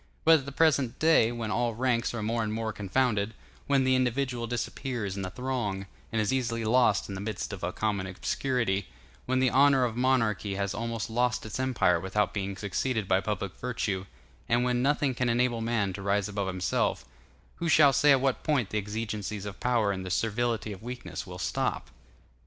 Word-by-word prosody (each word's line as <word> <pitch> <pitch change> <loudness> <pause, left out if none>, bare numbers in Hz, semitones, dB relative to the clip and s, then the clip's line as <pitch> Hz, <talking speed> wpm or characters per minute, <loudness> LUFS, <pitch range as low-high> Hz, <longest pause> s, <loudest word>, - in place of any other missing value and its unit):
But 160 0 +7
at 135 - -10
the - - -4
present 140 -5 +2
day, 155 -8 +4
when 115 -3 -4
all 115 +4 0
ranks 120 -1 +1
are 110 - -3
more 115 +2 0
and 110 -1 -2
more 110 0 -2
confounded, 105 +1 0 0.3
when 140 -2 +3
the 130 0 +3
individual 125 -1 0
disappears 120 -3 -3
in 100 - -4
the 95 - -3
throng, 110 -4 -3 0.3
and 115 - 0
is 105 +3 +1
easily 115 -3 -1
lost 110 -3 +3
in 100 - -6
the 95 - -5
midst 105 0 -4
of 100 - -7
a 90 - -1
common 100 -2 -1
obscurity, 100 0 -1 0.4
when 130 - +1
the 130 -1 +3
honor 135 -1 +5
of 115 -2 -3
monarchy 115 -6 +1
has 100 0 -1
almost 115 -2 -3
lost 120 0 0
its 110 +3 -5
empire 125 -10 +2
without 95 +3 0
being 100 -1 -3
succeeded 110 +2 -1
by 95 0 +3
public 100 -2 -3
virtue, 105 -6 -2 0.4
and 120 +1 +3
when 125 0 +1
nothing 140 0 +2
can 125 0 0
enable 120 0 +1
man 110 -4 0
to 100 - -7
rise 100 0 +1
above 100 -1 -3
himself, 95 -7 -1 0.5
who 170 - -2
shall 145 -3 +6
say 145 +2 +5
at 135 -2 +5
what 135 -1 +1
point 140 -10 0
the 105 - +1
exigencies 105 -1 -4
of 100 -1 -7
power 120 -5 +2
and 95 -1 -4
the 95 - -5
servility 115 +2 0
of 95 - -8
weakness 125 +2 -6
will - - -8
stop? - - -2
115 Hz, 200 wpm, -28 LUFS, 100-125 Hz, 0.5 s, But